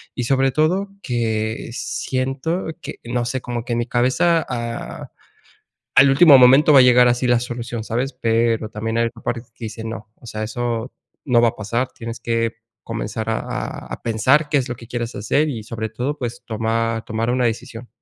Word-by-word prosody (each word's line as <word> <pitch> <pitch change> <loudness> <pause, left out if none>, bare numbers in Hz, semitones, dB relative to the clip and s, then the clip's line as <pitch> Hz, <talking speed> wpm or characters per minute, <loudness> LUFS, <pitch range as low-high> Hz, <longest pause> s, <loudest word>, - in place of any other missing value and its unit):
y 125 - -2
sobre 135 +1 +2
todo 175 +8 +1 0.2
que 110 -2 -1
siento 135 +9 -2
que - - -6
no 120 0 -2
sé, 125 +1 -2
como 120 -1 -4
que 120 - -2
en 120 - 0
mi 120 - -2
cabeza, 130 +7 +2
ah, 120 -2 -5 0.9
al 135 +1 +8
último 140 0 +8
momento 135 +5 +7
va 140 - +9
a - - +9
llegar 125 0 +6
así 120 +1 +1
la 120 - +4
solución, 120 -2 -5
¿sabes? 125 +4 -2
Pero 115 -2 +1
también 115 +1 -3
hay 115 - +3
otra 115 0 -8
parte 120 -1 -2
que 115 - -7
dice 110 +1 -7
no, 110 -1 -7
o - - -16
sea, 110 -1 -5
eso 120 +1 -3 0.3
no 125 -4 +4
va 120 - +5
a - - -18
pasar. 115 +4 -1
Tienes 115 0 -7
que 115 -1 -1 0.3
comenzar 110 0 -4
a 110 - 0 0.5
a - - -7
pensar 130 +7 +2
qué 145 - +2
es 130 -1 -2
lo 120 - -3
que 115 0 -13
quieres 120 -1 -4
hacer 140 +10 +1
y 115 -7 -4
sobre 110 -1 -4
todo, 130 +6 -3
pues 120 -3 -5
tomar 115 0 -1
tomar 115 +2 -2
una 125 0 +1
decisión. 120 +1 -5
120 Hz, 195 wpm, -21 LUFS, 115-130 Hz, 0.9 s, va